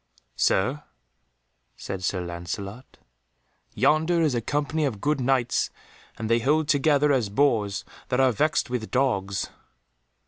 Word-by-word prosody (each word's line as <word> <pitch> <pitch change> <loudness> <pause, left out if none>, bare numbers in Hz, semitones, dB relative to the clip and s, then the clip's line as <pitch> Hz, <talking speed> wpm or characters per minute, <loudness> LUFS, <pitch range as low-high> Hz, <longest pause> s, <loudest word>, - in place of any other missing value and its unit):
"Sir," 130 +10 +1 0.9
said 95 -1 -6
Sir 90 0 -1
Lancelot, 95 +7 -7 0.8
"yonder 160 +3 +3
is 150 -4 +2
a 120 - 0
company 145 +5 -1
of 125 -8 -1
good 145 +3 0
Knights 125 -2 +1 0.5
and 110 - -4
they 115 +1 +3
hold 150 +5 +2
together 145 0 +3
as 125 -7 +1
boars 105 -4 +1 0.2
that 125 - 0
are 130 -1 +5
vexed 150 +7 +1
with 120 -3 -3
dogs." 100 -7 0
125 Hz, 130 wpm, -25 LUFS, 100-145 Hz, 0.9 s, are